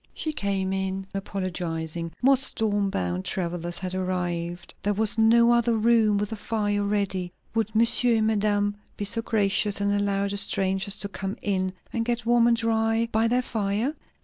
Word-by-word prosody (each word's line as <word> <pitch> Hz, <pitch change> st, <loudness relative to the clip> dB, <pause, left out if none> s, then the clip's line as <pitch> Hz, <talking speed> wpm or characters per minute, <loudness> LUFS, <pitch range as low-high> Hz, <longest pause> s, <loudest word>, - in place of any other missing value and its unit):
She 310 Hz, -, -2 dB
came 195 Hz, -6 st, -1 dB
in 190 Hz, 0 st, -2 dB
apologizing. 170 Hz, -4 st, -4 dB
More 270 Hz, +1 st, +6 dB
storm 215 Hz, -6 st, 0 dB
bound 90 Hz, -, -2 dB
travellers 175 Hz, -, -3 dB
had 185 Hz, -1 st, -4 dB
arrived 175 Hz, -2 st, -3 dB
there 205 Hz, 0 st, 0 dB
was 220 Hz, +1 st, +1 dB
no 235 Hz, +1 st, +5 dB
other 235 Hz, -1 st, +2 dB
room 220 Hz, -2 st, +3 dB
with 205 Hz, +1 st, -2 dB
a -, -, -2 dB
fire 205 Hz, -1 st, -1 dB
ready 200 Hz, -3 st, -1 dB, 0.2 s
would 220 Hz, -1 st, -1 dB
monsieur 235 Hz, +1 st, +4 dB
and 220 Hz, -1 st, +2 dB
madame 205 Hz, -1 st, +1 dB, 0.2 s
be 205 Hz, -, -2 dB
so 230 Hz, +3 st, 0 dB
gracious 205 Hz, -2 st, +1 dB
and 200 Hz, 0 st, +1 dB
allow 200 Hz, -1 st, 0 dB
the 200 Hz, 0 st, -3 dB
strangers 195 Hz, 0 st, +1 dB
to 200 Hz, -, +1 dB
come 195 Hz, 0 st, -5 dB
in 185 Hz, -2 st, 0 dB, 0.2 s
and 230 Hz, -, 0 dB
get 240 Hz, 0 st, -2 dB
warm 240 Hz, 0 st, +4 dB
and 235 Hz, -1 st, +3 dB
dry 225 Hz, 0 st, +1 dB
by 220 Hz, +1 st, +2 dB
their 250 Hz, +2 st, +1 dB
fire? 215 Hz, +5 st, -1 dB
205 Hz, 175 wpm, -25 LUFS, 190-225 Hz, 0.2 s, More